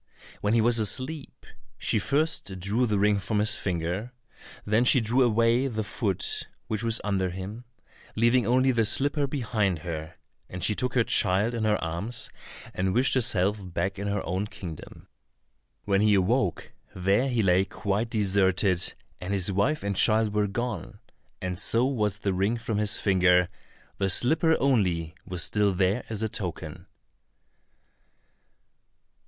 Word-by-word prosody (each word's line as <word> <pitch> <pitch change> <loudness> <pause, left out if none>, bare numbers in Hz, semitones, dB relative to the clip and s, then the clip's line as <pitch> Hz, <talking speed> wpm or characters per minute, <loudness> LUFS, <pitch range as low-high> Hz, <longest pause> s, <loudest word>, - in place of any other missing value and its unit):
When 105 +2 0
he 115 - +4
was 115 +1 +3
asleep, 130 +8 -2 0.3
she - - +1
first 140 -10 -1
drew 105 +7 0
the 105 -2 0
ring 105 0 +2
from 100 +3 -2
his 105 +1 +3
finger, 90 +6 -3 0.5
then 110 +3 +2
she 130 +1 +5
drew 120 +3 +1
away 115 +2 +2
the 110 -4 -3
foot 100 -3 -3 0.2
which 110 -1 -3
was 115 -1 +1
under 95 -3 -1
him, 95 +6 -8 0.5
leaving 120 0 +2
only 130 +2 +3
the 115 -2 +1
slipper 140 +6 +3
behind 115 - -1
her, 80 -1 -6 0.3
and 90 0 -6
she 105 - +3
took 125 +3 -3
her 125 - +4
child 105 +2 +1
in 115 -2 -2
her 105 -1 +2
arms, 85 +9 -1 0.4
and 95 +1 -1
wished 130 +3 +3
herself 105 -5 +2
back 95 +4 -3
in 100 - -4
her 100 -1 -2
own 95 +4 -2
kingdom. 85 -6 -10 0.8
When 100 -1 +1
he 105 -1 +4
awoke, 95 0 0 0.2
there 100 +8 +1
he 120 -3 0
lay 90 0 +3
quite 105 +3 -3
deserted, 95 -4 +1 0.2
and 95 +3 -3
his 95 0 0
wife 130 +11 0
and 100 0 -2
child 110 +1 +2
were 105 -1 +1
gone, 105 -2 -5 0.5
and 90 -1 -3
so 115 +4 +2
was 105 -7 -1
the 100 -1 -2
ring 100 +6 0
from 115 -2 -3
his 105 -1 +3
finger, 90 -2 +3 0.5
the 95 -1 0
slipper 160 - +4
only 90 - 0
was 90 -2 0
still 105 -2 +1
there 95 +6 0
as 110 -1 -3
a - - +1
token. 95 -5 -6
105 Hz, 155 wpm, -26 LUFS, 95-115 Hz, 0.8 s, she